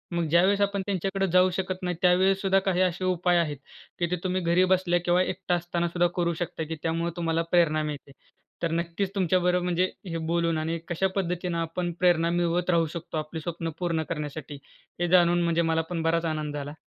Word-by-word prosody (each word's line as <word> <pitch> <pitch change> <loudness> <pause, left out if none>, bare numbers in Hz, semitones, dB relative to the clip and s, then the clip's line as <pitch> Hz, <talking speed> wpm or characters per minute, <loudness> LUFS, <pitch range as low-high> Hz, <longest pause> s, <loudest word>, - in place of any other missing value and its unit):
मग 170 -1 0
ज्यावेळेस 185 +5 +4
आपण 200 0 +1
त्यांच्याकडं 195 0 -1
जाऊ 185 +1 +5
शकत 185 0 -3
नाही. 180 -1 -1
त्यावेळेस 190 +2 +3
सुद्धा 195 -1 +3
काही 185 -2 +1
असे 185 0 0
उपाय 180 -1 +2
आहेत, 155 -4 0 0.4
की 175 - +2
ते - - +2
तुम्ही 185 0 -1
घरी 170 +1 +3
बसल्या 175 -1 +1
किंवा 175 +1 +3
एकटा 185 -1 -1
असताना 175 0 -2
सुद्धा 175 +1 +2
करू 170 -1 +1
शकता, 165 -1 -3
की 160 +1 -5
त्यामुळं 165 +1 -1
तुम्हाला 165 -1 0
प्रेरणा 155 -3 +3
मिळते. 150 -2 -6 0.5
तर 170 - 0
नक्कीच 170 +3 -1
तुमच्याबरोबर 180 -1 +2
म्हणजे 180 +1 +1 0.2
हे 165 - -3
बोलून 170 -1 +1
आणि 160 +2 -2
कशा 175 +3 0
पद्धतीनं 180 -2 -2
आपण 165 +2 -2
प्रेरणा 170 -2 +3
मिळवत 175 +1 0
राहू 170 -2 +3
शकतो 170 -1 -5
आपली 155 +1 -4
स्वप्नं 165 0 -4
पूर्ण 170 -3 0
करण्यासाठी 150 -2 -5 0.4
हे 175 - +1
जाणून 175 -1 +4
म्हणजे 170 0 +2
मला 165 -1 +1
पण 175 -2 -2
बराच 165 +1 +1
आनंद 155 -2 -2
झाला. 145 0 -5
175 Hz, 195 wpm, -26 LUFS, 165-180 Hz, 0.5 s, जाऊ